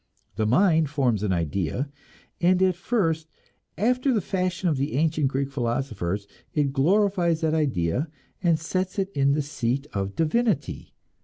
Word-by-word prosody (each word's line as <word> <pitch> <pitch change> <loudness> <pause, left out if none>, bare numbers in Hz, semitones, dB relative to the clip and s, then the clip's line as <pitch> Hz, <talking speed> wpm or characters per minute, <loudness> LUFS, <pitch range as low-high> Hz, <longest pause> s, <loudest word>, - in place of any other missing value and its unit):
The 110 - 0
mind 160 - +4
forms 130 -8 +1
an 105 -2 0
idea, 90 - -1 0.5
and 180 +1 +4
at 185 -1 +4
first, 170 -5 0 0.5
after 250 +6 +2
the 230 - +2
fashion 185 -1 -1
of 155 -5 +1
the 140 +3 -1
ancient 155 -1 +2
Greek 135 +1 -2
philosophers, 115 -7 -2 0.3
it 145 -3 +1
glorifies 175 +2 +2
that 160 -1 +1
idea 135 - 0 0.3
and 170 -3 +3
sets 185 +4 -2
it 195 0 -1
in 140 -4 +2
the 150 0 0
seat 135 -2 -2
of 100 -1 -2
divinity. 165 - 0
155 Hz, 150 wpm, -25 LUFS, 130-180 Hz, 0.5 s, mind